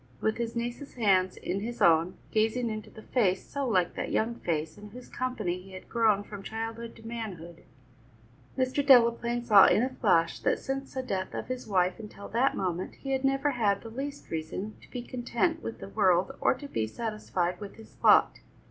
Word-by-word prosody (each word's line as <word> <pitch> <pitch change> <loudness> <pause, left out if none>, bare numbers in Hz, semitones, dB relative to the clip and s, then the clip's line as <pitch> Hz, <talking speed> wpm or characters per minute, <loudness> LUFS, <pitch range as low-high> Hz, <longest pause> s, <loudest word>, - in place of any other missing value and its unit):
With 220 - 0
his 235 0 -3
niece's 240 +4 -4
hands 190 -5 +2
in 185 +3 -3
his 235 +4 -5
own, 165 +2 +4 0.2
gazing 225 +2 +1
into 215 0 -6
the 220 - -13
face 195 -7 +1
so 280 -2 -3
like 185 -6 +2
that - - -4
young 225 +2 +1
face 160 -7 -2
in 210 0 -11
whose 250 +4 -11
company 215 -9 -3
he 190 +1 -14
had 185 - -10
grown 220 -4 +3
from 205 -1 -9
childhood 225 +2 -5
to 225 - -12
manhood, 185 -8 -7 1.0
Mr. 260 +2 +1
Delaplaine 240 -2 +5
saw 210 -5 +8
in 220 - +4
a 255 - +1
flash, 190 -10 +2
that - - +1
since 270 0 -5
the 260 - -2
death 190 -6 -3
of - - -5
his 255 -2 -4
wife 185 -2 +1
until 210 -2 -9
that 255 +5 +1
moment 180 -1 -2
he 270 - -6
had 265 0 0
never 270 +2 +2
had 210 -6 +1
the 225 - -8
least 280 +4 -6
reason 165 +6 -4
to - - -17
be 245 -2 -5
content 250 +7 -1
with 230 - -5
the - - -9
world 190 0 +3
or - - +3
to 285 - -9
be 110 - -1
satisfied 185 - -2
with 205 -1 -8
his 220 - -15
lot. - - +6
220 Hz, 200 wpm, -29 LUFS, 190-245 Hz, 1.0 s, saw